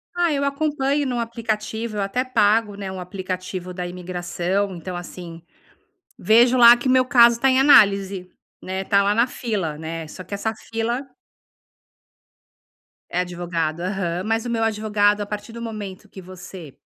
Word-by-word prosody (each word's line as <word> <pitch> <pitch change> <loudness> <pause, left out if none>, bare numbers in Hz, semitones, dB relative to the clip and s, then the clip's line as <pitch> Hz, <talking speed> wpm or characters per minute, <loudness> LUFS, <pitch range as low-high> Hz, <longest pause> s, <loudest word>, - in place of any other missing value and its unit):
Ah, 345 -2 +2
eu 280 -1 0
acompanho 280 0 0
no 245 -2 -2
aplicativo, 225 -1 -3
eu - - 0
até 200 +6 -1
pago, 215 -3 +2
né, 195 -1 -6
um 190 - -7
aplicativo 185 0 -6
da 180 -1 -5
imigração, 180 +2 -3
então 175 +1 -7
assim, 175 -1 -9 0.8
vejo 240 +3 +4
lá 240 -1 +9
que 240 - -4
o 255 - +3
meu 255 0 +4
caso 240 -3 +6
está 270 +3 +2
em 260 0 +3
análise, 195 -8 +4 0.3
né, 190 +1 -4
está 200 +1 +2
lá 205 +1 +1
na 235 +3 +3
fila, 195 -13 -3
né, 160 0 -6
só 185 +4 -10
que 185 - -10
essa 220 +3 -2 0.2
fila 235 +4 -2 2.0
É 180 - -1
advogado, 170 -2 -3
aham. 180 -1 -2
Mas 225 +1 -1
o 240 - -3
meu 225 -1 0
advogado, 210 -1 +1
a 205 - -2
partir 210 +2 -7
do 235 - -8
momento 210 -3 -7
que 190 - -11
você 185 -4 -11
205 Hz, 165 wpm, -22 LUFS, 180-235 Hz, 2.0 s, lá